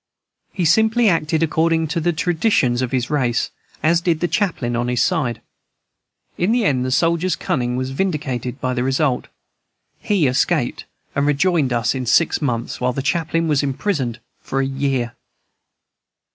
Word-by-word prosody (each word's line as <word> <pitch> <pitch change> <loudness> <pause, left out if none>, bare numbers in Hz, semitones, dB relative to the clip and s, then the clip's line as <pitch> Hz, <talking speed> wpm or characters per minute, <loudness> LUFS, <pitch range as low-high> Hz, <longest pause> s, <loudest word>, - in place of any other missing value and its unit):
He 180 -3 -2
simply 220 +7 +4
acted 160 -3 +1
according 160 +1 +1
to 170 - -1
the 175 +2 +1
traditions 160 - +1
of 130 - -2
his 125 0 -1
race, 125 -5 0 0.3
as 165 +2 +3
did 170 -3 +1
the 175 - 0
chaplain 165 - -1
on 120 +1 -1
his 125 -1 +1
side. 120 -3 -1 1.0
In 180 +5 +2
the 235 -2 +2
end 130 -7 +2
the 130 - -2
soldier's 170 +5 +1
cunning 125 -2 -1
was 130 +1 -3
vindicated 135 -6 -2
by 130 0 -1
the 125 - -1
result; 135 0 0 0.7
he 195 -7 +1
escaped, 130 -1 0 0.3
and 140 +1 +1
rejoined 150 -1 +2
us 120 -2 +1
in 130 -2 -4
six 165 +8 +3
months, 120 -5 -2
while 125 0 +1
the 135 - -3
chaplain 165 +2 0
was 150 -3 +2
imprisoned 135 - -2 0.2
for 135 - -3
a 135 - +1
year. 135 -3 -1
140 Hz, 160 wpm, -20 LUFS, 125-170 Hz, 1.0 s, simply